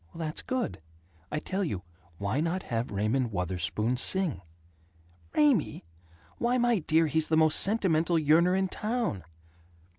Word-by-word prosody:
"That's 160 -2 -3
good. 255 - -3 0.5
I - - -2
tell 190 +6 -3
you: 100 - -4 0.3
why 100 +8 -2
not 170 +4 -1
have 115 +1 -3
Raymond 110 +5 -1
Wutherspoon 95 +6 -1
sing?" 185 - 0 0.9
"Raymie? 245 - +2 0.5
Why, 245 +1 +1
my 240 -3 +2
dear, 160 0 +2
he's 160 0 +1
the 160 - +1
most 155 -1 +5
sentimental 175 -5 +3
yearner 165 +4 +3
in 190 0 0
town!" 215 - -3
160 Hz, 130 wpm, -28 LUFS, 115-190 Hz, 0.9 s, most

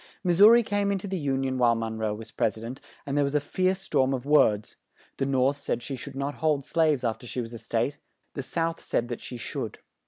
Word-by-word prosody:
Mis 175 -1 +1
sou 205 +2 +10
ri 235 +1 +6
came 205 -1 0
in 200 - +1
to 195 - -6
the 190 - -2
Un 135 0 0
ion 130 -1 -1
while 120 -1 +4
Mon 115 -1 -3
roe 110 -1 0
was 110 +1 -10
Pres 110 -1 0
i - - -9
dent, 120 +4 -7 0.2
and 140 - -3
there 145 - +3
was 140 +1 -1
a - - +5
fierce 185 +5 0
storm 135 -7 +1
of 130 0 -6
words; 110 -8 +3 0.4
the 135 - 0
North 135 +1 +2
said 120 - -2
she 135 - -4
should 135 +2 -8
not 140 +1 -2
hold 150 -4 +1
slaves 155 -5 +2
after 120 +1 -2
she 125 - -4
was 115 -1 -5
a 115 - -7
State, 115 +5 -1 0.3
the 140 - -3
South 165 +4 -2
said 120 +1 -1
that 120 - -5
she 125 - -7
should. 115 - -5
135 Hz, 255 wpm, -27 LUFS, 120-160 Hz, 0.4 s, sou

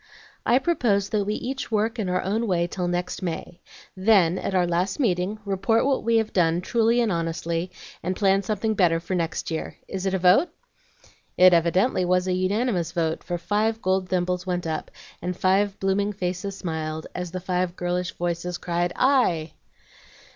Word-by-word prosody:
"I 240 - +5
propose 240 - +1
that 210 -3 0
we 210 +1 -1
each 265 +2 -4
work 220 +2 0
in 195 -4 -1
our 185 0 0
own 220 +5 -1
way 175 -3 +1
till 180 0 -3
next 175 +1 -2
May, 175 -1 -5 0.3
then, 185 -3 +3
at 195 - -3
our 180 -1 +3
last 175 +5 -1
meeting, 195 -4 0
report 200 +4 +1
what 275 -1 +1
we 230 0 +2
have 220 -1 0
done, 170 -2 +3
truly 230 +4 +2
and 230 -3 +1
honestly, 165 +1 -2 0.3
and 185 +2 -2
plan 195 -1 +3
something 215 +1 -1
better 175 -5 +3
for 170 +3 -5
next 170 -2 -2
year. 160 - -4
Is 190 0 -3
it 190 - 0
a - - +2
vote?" 185 - +4 0.9
It 185 0 +7
evidently 180 +5 +2
was 180 +1 +1
a 185 - +1
unanimous 185 -1 0
vote, 165 -2 -1
for 175 - -3
five 215 +5 0
gold 185 -2 0
thimbles 180 0 0
went 180 -1 -1
up, 160 -1 -3 0.3
and 180 +1 -3
five 195 +2 +2
blooming 200 +2 0
faces 190 +1 -3
smiled 160 -2 -4
as 180 -1 -4
the 185 +2 -5
five 180 -1 -1
girlish 180 0 -2
voices 175 0 -2
cried, 175 0 -1
"Aye!" 185 - +2
185 Hz, 180 wpm, -24 LUFS, 175-205 Hz, 0.9 s, It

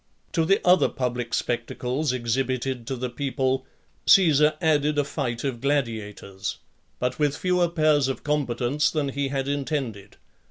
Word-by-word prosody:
To 165 -2 +1
the 195 +4 +3
other 180 0 +5
public 125 -2 -3
spectacles 125 +4 -1
exhibited 130 0 -2
to 135 - -2
the 125 0 -4
people, 130 0 -1 0.4
Caesar 155 -5 +6
added 150 -3 +2
a 145 - +3
fight 125 -5 -3
of 130 -4 -3
gladiators, 110 -8 -2 0.4
but 125 +2 -2
with 145 -1 +1
fewer 180 -1 +1
pairs 155 -4 +3
of 135 - -4
combatants 145 0 0
than 150 -3 -1
he 140 +1 -2
had 135 0 -2
intended. 135 -8 -3
135 Hz, 145 wpm, -25 LUFS, 125-150 Hz, 0.4 s, Caesar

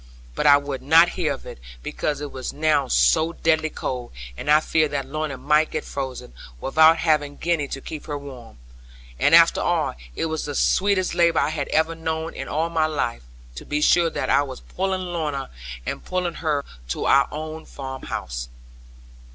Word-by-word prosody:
But - - 0
I 145 0 +8
would 140 -2 -5
not 165 +5 +6
hear 175 -4 -1
of - - -6
it; - - -9 0.2
because 145 -1 -3
it 145 - -5
was 130 -1 -5
now 150 -2 +1
so 160 +5 +3
deadly 160 -1 +1
cold, 125 -5 -5 0.2
and 145 - -6
I 150 +1 +7
feared 155 -1 +1
that 140 -2 -2
Lorna 150 0 -4
might 150 +4 +2
get 155 - -4
frozen, 130 - -6 0.3
without 160 - +5
having 150 -3 +1
Gwenny 165 -4 0
to 135 - -6
keep 155 +1 -8
her 145 -2 -3
warm. 130 - -11 0.6
And - - +5
after - - +6
all, - - 0 0.2
it - - -1
was 160 -1 -3
the 145 -1 -5
sweetest 190 +2 +2
labour 170 -2 +3
I 145 - +1
had 155 -3 -3
ever 160 +1 +1
known 160 0 -3
in - - -6
all 160 +3 -1
my 160 -2 +2
life, 140 - -2 0.3
to - - -8
be 150 - -2
sure 170 +2 +4
that - - -2
I - - +5
was 135 -3 -6
pulling 190 0 -2
Lorna, 155 -6 -3 0.3
and - - -4
pulling 180 -2 -2
her 150 -3 0 0.2
to - - -3
our 140 0 +5
own 155 +1 -6
farmhouse. 130 - -6
150 Hz, 185 wpm, -23 LUFS, 140-160 Hz, 0.6 s, I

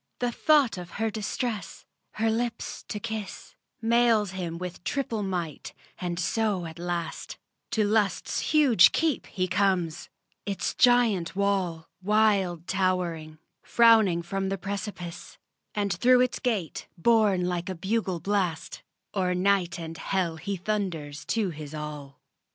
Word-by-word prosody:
The 245 -1 -1
thought 275 -6 +3
of 175 -1 -8
her 225 0 0
distress, 215 +1 -4 0.3
her 220 +1 +1
lips 230 0 -3
to 210 - -4
kiss, 220 -3 -6 0.3
Mails 230 -3 +3
him 175 -3 -4
with 180 0 -7
triple 230 0 -2
might; 175 -6 -4 0.3
and 175 -2 -3
so 195 -1 0
at 160 0 -9
last 175 -1 -4 0.3
To 220 -2 +1
Lust's 210 -1 +1
huge 270 - +6
keep 315 -5 0
he 185 -3 -2
comes; 180 -3 0 0.3
its 200 -2 -2
giant 230 -9 +3
wall, 190 -5 0
Wild 195 -4 +2
towering, 175 -5 -1 0.2
frowning 220 -7 +5
from 195 +2 -2
the 195 - -1
precipice; 195 -2 -6 0.4
And 200 -2 0
through 250 +8 +5
its 250 -1 0
gate, 210 - -2
borne 205 -2 +3
like 180 0 -2
a 190 - -3
bugle 190 0 -1
blast, 180 -2 -2 0.3
O'er 185 -2 0
night 185 -1 +2
and 165 -1 -7
hell 180 -4 -1
he 195 +5 -4
thunders 170 -7 -3
to 195 +1 0
his 155 -1 -8
all. 150 -2 -7
190 Hz, 135 wpm, -27 LUFS, 175-220 Hz, 0.4 s, huge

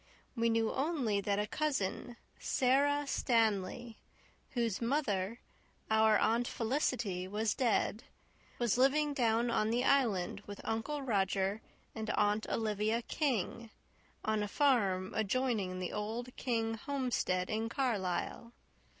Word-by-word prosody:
We 230 -1 +2
knew 225 -1 +2
only 265 -9 0
that 200 0 0
a 210 - +1
cousin, 245 -3 -2 0.2
Sara 285 +3 +2
Stanley, 225 -3 0 0.5
whose 230 -5 -1
mother, 230 -5 0 0.5
our 220 -1 +5
Aunt 235 +3 +2
Felicity, 225 -7 -1
was 210 +2 0
dead, 230 -3 +1 0.5
was 240 -1 +1
living 290 +3 +3
down 235 -2 +2
on 215 -2 +1
the 240 +2 +1
Island 220 -10 +2
with 205 0 -7
Uncle 275 +6 -2
Roger 195 -2 0 0.3
and 220 -1 -5
Aunt 210 +1 +1
Olivia 220 +1 0
King, 235 - -1 0.6
on 215 -1 +1
a 210 - -1
farm 200 -8 +2
adjoining 220 -4 0
the 185 -1 -4
old 225 +4 -4
King 225 -3 -1
homestead 225 -7 -1
in 220 +1 -1
Carlisle. 230 -2 -2
225 Hz, 120 wpm, -33 LUFS, 205-250 Hz, 0.6 s, our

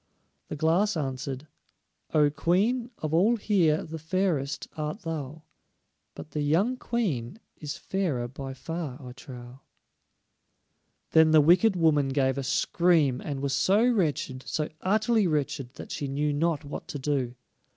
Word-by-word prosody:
The - - -5
Glass 170 +6 +2
answered: 135 -1 -4 0.7
"O 150 -2 +4
Queen, 220 - +1
of 155 0 -4
all 200 +9 +4
here 180 -8 +2
the 160 +1 -7
fairest 160 -5 -1
art 155 +7 -4
thou, 155 -2 -5 0.7
But - - -10
the 150 - -2
young 175 - +2
Queen 195 - -2 0.2
is 145 -2 -6
fairer 160 -11 -2
by 135 +1 -7
far 160 -2 -5
I 125 -4 -9
trow." 125 -1 -11 1.5
Then 160 0 +6
the 155 0 +6
wicked 180 +7 +5
woman 155 -5 +3
gave 135 0 +1
a - - -3
scream, 155 -2 +2
and 140 -2 -4
was 140 -1 -1
so 210 +5 +3
wretched, 150 - 0
so 155 -1 -2
utterly 215 +1 +2
wretched, 140 -4 -2
that - - -9
she 145 - -3
knew 145 +2 -1
not 155 0 0
what 145 - -7
to - - -5
do. 130 -3 -1
155 Hz, 145 wpm, -27 LUFS, 135-180 Hz, 1.5 s, Then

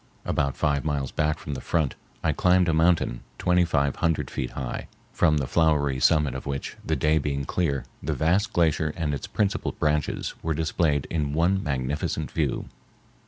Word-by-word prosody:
About 70 -1 0
five 70 -2 +1
miles 70 -4 -1
back 75 0 0
from 75 - -6
the 65 - -5
front 80 -5 0 0.3
I - - +3
climbed 90 0 +3
a 85 - +2
mountain 80 -6 +2 0.2
twenty 90 0 +3
five 70 -4 +1
hundred 80 -2 0
feet 65 - -3
high, 65 -2 -4 0.3
from 80 -3 +3
the 70 - 0
flowery 75 -3 +2
summit 75 +1 +3
of 65 - -6
which, 70 -1 -4
the - - 0
day 75 +1 +2
being 70 -2 -2
clear, 70 -4 -1 0.2
the 75 +2 -2
vast 90 +8 +2
glacier 80 -2 +2
and 80 -3 -1
its 70 - -4
principal 100 -2 -1
branches 75 -1 -1
were 80 -2 -1
displayed 80 -2 +1
in 75 -3 -1
one 90 +5 +2
magnificent 70 -1 -2
view. - - -1
75 Hz, 175 wpm, -26 LUFS, 70-85 Hz, 0.3 s, I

